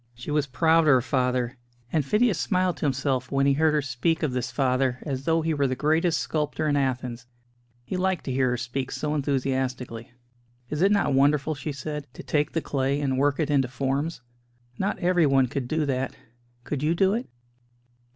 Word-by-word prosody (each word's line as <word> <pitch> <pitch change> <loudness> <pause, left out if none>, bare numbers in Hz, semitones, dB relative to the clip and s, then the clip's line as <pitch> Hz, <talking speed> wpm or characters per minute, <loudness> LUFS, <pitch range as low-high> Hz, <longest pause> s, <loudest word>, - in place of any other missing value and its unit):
She 120 +5 -7
was 150 -1 +1
proud 160 +5 +3
of 165 - +3
her 130 -4 +6
father; 125 -1 0 0.3
and 155 - +2
Phidias 210 - +2
smiled 185 0 +1
to - - -3
himself 130 -1 -1
when 135 0 +2
he 140 - +4
heard 155 +2 +2
her 150 - +1
speak 145 +6 -1
of 150 - +1
this 125 -1 -2
father 130 0 +1
as 135 -3 -4
though 165 0 +2
he 160 0 0
were 140 -2 +1
the 130 - -1
greatest 160 +4 +2
sculptor 155 0 -1
in 145 - +2
Athens. 125 -3 -2 0.6
He 185 - -3
liked 190 -1 0
to 135 - -2
hear 130 0 +2
her 125 - 0
speak 125 +2 -3
so 150 -1 -2
enthusiastically. 130 -4 -2 0.6
"Is 150 +1 -2
it 195 +2 +4
not 200 -9 +2
wonderful," 145 +3 +3
she 150 +1 -5
said, 145 +1 -5
"to - - -8
take 145 +3 0
the 165 - 0
clay 140 0 -1
and 135 -2 0
work 145 +2 +2
in 150 -2 0
into 135 -3 +3
forms? 135 +4 -2 0.6
Not 200 +2 0
everyone 160 -8 +3
could 125 0 -4
do 155 +2 0
that 130 -1 -2 0.5
could 140 +1 -3
you 155 +3 +1
do 190 +2 +3
it?" 235 - -3
140 Hz, 200 wpm, -26 LUFS, 130-155 Hz, 0.6 s, her